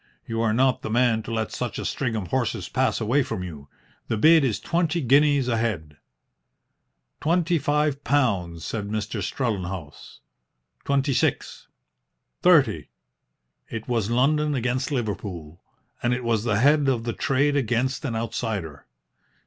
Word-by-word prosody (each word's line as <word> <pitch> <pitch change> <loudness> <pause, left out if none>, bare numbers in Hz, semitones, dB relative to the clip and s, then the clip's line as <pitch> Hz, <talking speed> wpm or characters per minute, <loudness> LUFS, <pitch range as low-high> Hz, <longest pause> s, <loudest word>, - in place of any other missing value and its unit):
You 115 0 -2
are 115 -1 +2
not 130 +2 +2
the - - -5
man 120 -1 +2
to 115 - -8
let 110 -1 -2
such 125 -1 -4
a - - -4
string 125 -5 -2
of 100 -5 -4
horses 125 -6 -1
pass - - 0
away 120 +6 +2
from 130 -8 -4
you. 75 -6 -9 0.4
The 110 - -1
bid 160 +6 +6
is 110 -6 0
twenty 170 0 0
guineas 140 0 +3
a 115 -2 +1
head." 85 -11 -3 1.2
"Twenty 170 +1 +1
five 145 -1 0
pounds," 95 - 0
said 105 -3 -4
Mr. 110 0 -3
Strellenhaus. 95 - -4 0.6
"Twenty 140 0 +1
six." 125 - -1 0.7
"Thirty." - - +4 0.8
It 115 -1 -6
was 115 -4 0
London 145 +5 +2
against 130 +2 -1
Liverpool, 95 - -4 0.4
and 120 0 +1
it 125 - -5
was 115 -2 0
the 105 -4 +1
head 145 +4 +4
of 120 -4 0
the 115 -1 -2
trade 140 +2 +1
against 130 +1 0
an 125 -6 -2
outsider. 110 -9 -4
120 Hz, 150 wpm, -24 LUFS, 105-140 Hz, 1.2 s, bid